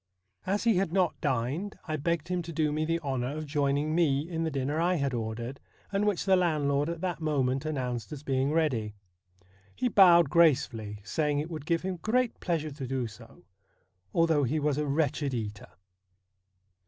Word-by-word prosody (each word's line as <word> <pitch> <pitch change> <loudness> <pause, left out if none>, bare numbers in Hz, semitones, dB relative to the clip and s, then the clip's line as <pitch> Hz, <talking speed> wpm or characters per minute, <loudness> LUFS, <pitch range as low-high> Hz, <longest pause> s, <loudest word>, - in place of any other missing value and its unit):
As 200 +2 0
he 230 -5 +3
had 190 -3 0
not 185 -1 +1
dined 135 - -1
I 155 - -1
begged 170 +2 -1
him 180 -1 0
to 170 0 -7
do 155 -1 0
me 155 +1 0
the 165 +1 0
honour 135 -1 -2
of 155 - -4
joining 145 +1 0
me 155 -3 +2
in 165 -2 -2
the 160 - 0
dinner 145 +2 -1
I 180 +2 +2
had 140 -4 -1
ordered, 115 +3 -4 0.3
and 200 +1 +1
which 205 -4 0
the 190 -1 +5
landlord 150 -4 +1
at 170 -1 -4
that 180 -3 -2
moment 135 -3 0
announced 125 -6 -3
as 145 -2 -7
being 135 0 0
ready. 125 -10 0 0.8
He 250 - 0
bowed 175 - +6
grace 170 -5 +5
fully, 105 -2 -8
saying 145 +9 0
it 155 +4 -3
would 155 -2 -6
give 165 0 +1
him 185 -1 -3
great 235 +6 0
pleasure 160 -4 -1
to 140 -2 -6
do 130 -1 -1
so, 115 -4 -12 0.7
although 165 -1 +3
he 145 +5 0
was 150 -1 0
a 150 - -1
wretched 145 -2 0
eater. 105 -5 -5
150 Hz, 190 wpm, -29 LUFS, 135-170 Hz, 0.8 s, bowed